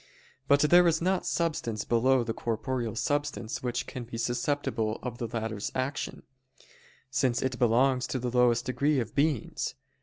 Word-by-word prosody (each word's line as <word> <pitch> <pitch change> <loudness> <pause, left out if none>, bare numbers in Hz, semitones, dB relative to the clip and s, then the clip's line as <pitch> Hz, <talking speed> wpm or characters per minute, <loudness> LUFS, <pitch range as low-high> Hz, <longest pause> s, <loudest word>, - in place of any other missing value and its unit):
But 140 0 +5
there 175 +4 +6
is 165 -1 +3
not 185 +2 0
substance 135 -10 -1
below 125 +2 +3
the 115 -1 -3
corporeal 120 0 -2
substance 145 -4 -2
which 125 -1 -2
can 125 - -6
be 115 0 -7
susceptible 120 -2 -1
of 120 -2 -5
the 120 - -2
latter's 110 -2 -3
action; 130 +2 -3 0.9
since 130 -3 +1
it 130 -1 -2
belongs 125 +2 +3
to - - -2
the 125 0 -3
lowest 120 0 +4
degree 140 +3 +1
of 115 -2 -4
beings. 145 -5 0
125 Hz, 155 wpm, -29 LUFS, 115-140 Hz, 0.9 s, there